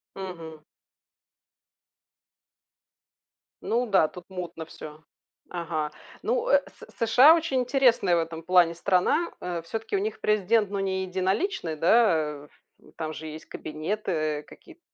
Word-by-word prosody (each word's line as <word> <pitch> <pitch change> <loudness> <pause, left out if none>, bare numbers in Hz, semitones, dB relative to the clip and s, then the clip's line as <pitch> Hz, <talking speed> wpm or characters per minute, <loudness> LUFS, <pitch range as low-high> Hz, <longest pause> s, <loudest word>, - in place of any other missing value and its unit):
Мгм. 165 -5 -8 3.0
Ну 240 +2 0
да, 190 -6 +4
тут 180 +1 -12
мутно 175 -3 -6
всё. 155 -1 -11 0.5
Ага. 160 -3 -3 0.3
Ну, - - -1
э, - - +5
С - - -16
С 230 - -1
США 270 +8 +8
очень 315 -6 0
интересная 250 -8 +3
в - - +2
этом 165 0 -4
плане 175 -1 +4
страна. 195 - +1
Э, 175 -2 -3
всё-таки 225 - -4
у 390 - +2
них 430 +2 -4
президент 210 0 +2
ну 200 0 -3
не 190 -1 -1
единоличный, 185 - -1
да, 210 +7 +4 0.3
э, - - -13
ф - - -23 0.3
м, - - -20
там 155 -1 -4
же 160 +1 -8
есть 155 0 -9
кабинеты, 165 +8 -4
э, 155 -2 -1
какие-т 340 -1 -16
185 Hz, 145 wpm, -26 LUFS, 165-230 Hz, 3.0 s, США